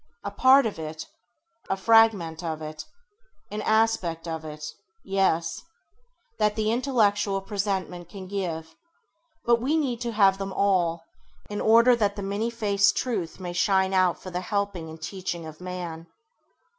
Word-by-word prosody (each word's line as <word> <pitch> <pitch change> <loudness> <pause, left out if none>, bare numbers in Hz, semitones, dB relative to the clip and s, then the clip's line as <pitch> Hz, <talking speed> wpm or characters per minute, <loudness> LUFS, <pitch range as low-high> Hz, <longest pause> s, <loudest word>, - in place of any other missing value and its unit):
A - - -4
part 265 +1 +6
of 210 -6 -3
it, 155 0 -6 0.6
a 195 - 0
fragment 200 -7 +4
of 160 -2 -3
it, 155 0 -7 0.7
an 210 +1 -3
aspect 220 -7 +1
of 160 -1 -4
it 150 -1 -7 0.2
— 450 +1 -46 0.2
yes 165 -3 +1 0.4
— 485 -1 -43
that 210 0 +2
the 215 0 0
intellectual 210 -6 +1
presentment 195 -3 -3
can 195 -2 -9
give; 165 -5 -4 0.7
but 235 -1 +3
we 290 +6 +1
need 250 -6 -1
to 240 -1 -2
have 195 -2 +4
them 195 -1 -4
all, 175 -5 +1 0.5
in 205 - -3
order 235 +3 +6
that 205 -3 0
the 200 - -5
many 200 +4 -1
faced 205 -4 +2
truth 200 -11 -2
may 180 -2 -5
shine 190 +1 +2
out 185 -2 +3
for 185 - -9
the 180 0 -3
helping 200 -4 -2
and 160 0 -11
teaching 175 -2 -4
of 155 +2 -10
man. 175 -2 -6
195 Hz, 160 wpm, -26 LUFS, 170-220 Hz, 0.7 s, part